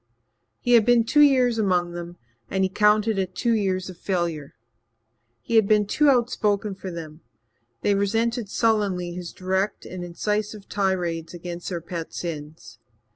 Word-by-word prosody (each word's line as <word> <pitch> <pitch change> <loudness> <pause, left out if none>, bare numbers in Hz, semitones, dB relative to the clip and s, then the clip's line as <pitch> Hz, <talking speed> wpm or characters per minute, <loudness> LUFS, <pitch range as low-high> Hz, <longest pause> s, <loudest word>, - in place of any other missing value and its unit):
He 245 - 0
had 235 -2 +7
been 240 +1 +4
two 295 +6 +3
years 255 -5 +4
among 180 -4 +1
them 175 0 -7 0.3
and 190 0 0
he 190 - +2
counted 210 +1 +3
it 185 -1 -3
two 235 -1 +1
years 190 -4 0
of 180 -2 -10
failure. 170 -6 -2 0.9
He 230 - +1
had 220 -3 +5
been 210 -1 +4
too 295 +8 +3
outspoken 215 -5 +1
for 190 0 -7
them; 160 -2 -8 0.6
they 205 - +2
resented 225 +3 0
sullenly 200 -6 +1
his 175 -1 -6
direct 190 +2 -2
and 180 -1 -7
incisive 210 +4 -3
tirades 180 -4 -1
against 175 0 -6
their 175 -3 -4
pet 170 0 -6
sins. 150 -7 -7
195 Hz, 155 wpm, -24 LUFS, 175-215 Hz, 0.9 s, had